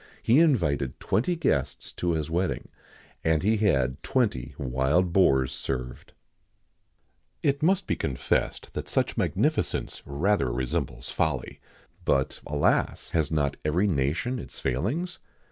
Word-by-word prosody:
He 120 +6 +5
invited 85 - +2
twenty 175 +11 +1
guests 70 - -1
to 85 -1 -1
his 80 -2 -1
wedding, 90 +3 -1 0.5
and 80 -1 +2
he 110 +3 +3
had 70 -11 +1
twenty 115 - 0
wild 70 +7 +1
boars 65 -9 +4
served.[XIX 65 -1 -5 1.3
70] - - +2
It - - -29
must 190 +3 +3
be - - 0
confessed 65 - -1
that - - -4
such - - +1
magnificence - - 0
rather 75 +1 +1
resembles - - -2
folly; 80 -5 -1 0.4
but, 65 -1 +1
alas! 75 0 +1
has 80 -3 +1
not 75 -3 0
every 85 +6 +2
nation 85 - 0
its - - -6
failings? 120 - -2
80 Hz, 130 wpm, -27 LUFS, 65-105 Hz, 1.3 s, He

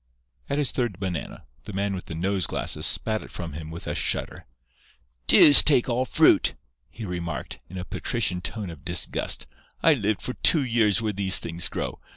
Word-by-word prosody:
At 140 - -2
his 145 -3 +1
third 120 -7 -3
banana, 90 -5 -6 0.2
the 105 - -9
man 100 +1 -2
with 95 - -7
the 80 - -8
nose 95 +2 -1
glasses - - -1
spat 110 -1 +1
it - - -12
from 85 -4 -8
him 80 +1 -8
with 80 +1 -9
a - - -4
shudder. - - -3 0.8
"Deuce 145 - +10
take 140 -5 +4
all 125 +2 0
fruit!" - - +3 0.4
he 110 +7 -9
remarked, 85 -7 -6
in 95 - -9
a 90 - -6
patrician 95 -7 -3
tone 100 -1 -6
of 80 -4 -14
disgust. - - 0 0.4
"I 165 - +5
lived 110 -6 -2
for 125 - -4
two 155 +1 +2
years 115 -4 +1
where 105 -1 -2
these 95 0 +2
things 85 +1 -1
grow. - - -6
100 Hz, 190 wpm, -24 LUFS, 90-120 Hz, 0.8 s, Deuce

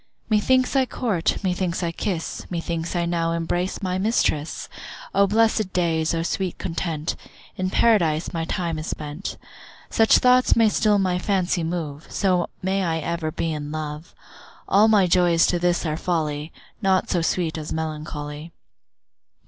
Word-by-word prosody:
Methinks 255 +6 +3
I 265 -1 +3
court, 205 -11 0
methinks 180 -1 -1
I 170 - 0
kiss, 170 -1 -4
Methinks 170 0 -3
I 170 0 +1
now 165 -1 0
embrace 175 +3 -2
my 185 0 -1
mistress. 190 -7 0 0.5
O 200 - +4
blessed 220 -1 +2
days, 165 -2 +1
O 165 - -1
sweet 185 +1 -2
content, 165 -2 -3 0.4
In 185 0 -1
Paradise 175 -8 +2
my 165 -1 -1
time 165 -2 -2
is 155 - -6
spent. 150 +5 -5 0.5
Such 225 0 +5
thoughts 255 0 +4
may 225 -2 +5
still 210 0 +3
my 185 -2 +1
fancy 185 -3 0
move, 160 -3 -4
So 180 -3 +1
may 190 +1 +1
I 165 -2 0
ever 160 0 -2
be 165 +1 -2
in 150 -1 -5
love. 155 +2 -6 0.5
All 205 +3 +5
my 210 -4 +5
joys 175 -1 +4
to 175 - +1
this 175 0 +1
are 155 -1 -1
folly, 155 -3 -2 0.3
Naught 190 -2 +2
so 175 - +2
sweet 165 0 0
as 155 -1 -6
melancholy. 155 0 -5
175 Hz, 155 wpm, -23 LUFS, 160-190 Hz, 0.5 s, Such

